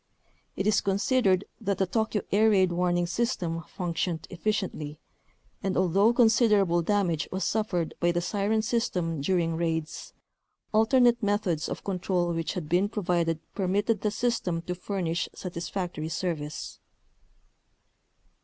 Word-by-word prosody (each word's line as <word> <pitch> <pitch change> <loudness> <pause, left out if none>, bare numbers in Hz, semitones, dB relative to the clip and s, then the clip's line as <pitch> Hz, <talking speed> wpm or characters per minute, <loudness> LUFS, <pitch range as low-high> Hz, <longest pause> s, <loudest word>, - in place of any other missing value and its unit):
It 195 - -2
is 215 - +3
considered 200 -1 +2
that 200 0 -1
the 190 - +2
Tokyo 220 +2 -1
air 215 +3 +5
raid 190 -4 +4
warning 175 0 +1
system 175 -4 -1 0.2
func 175 -3 -2
tioned 165 -1 -2
efficiently, 180 -6 -2 0.6
and 195 -1 -1
although 190 +4 +4
considerable 215 -7 +4
damage 175 -4 0
was 190 +1 -2
suffered 200 -6 -1
by 175 0 +3
the 175 - 0
siren 205 +4 0
system 180 - -1
during 165 +1 +1
raids, 160 -1 -3 0.6
alternate 240 +2 +4
methods 200 -7 0
of - - -5
control 180 -2 -1
which 165 -1 -2
had 175 -5 -4
been 180 +5 +2
provided 175 -6 0 0.2
permitted 205 +2 0
the 210 - +1
system 205 -7 -1
to 180 - -3
furnish 180 -2 -2
satisfactory 175 -2 -4
service. 155 -4 -4
185 Hz, 130 wpm, -27 LUFS, 170-210 Hz, 0.6 s, air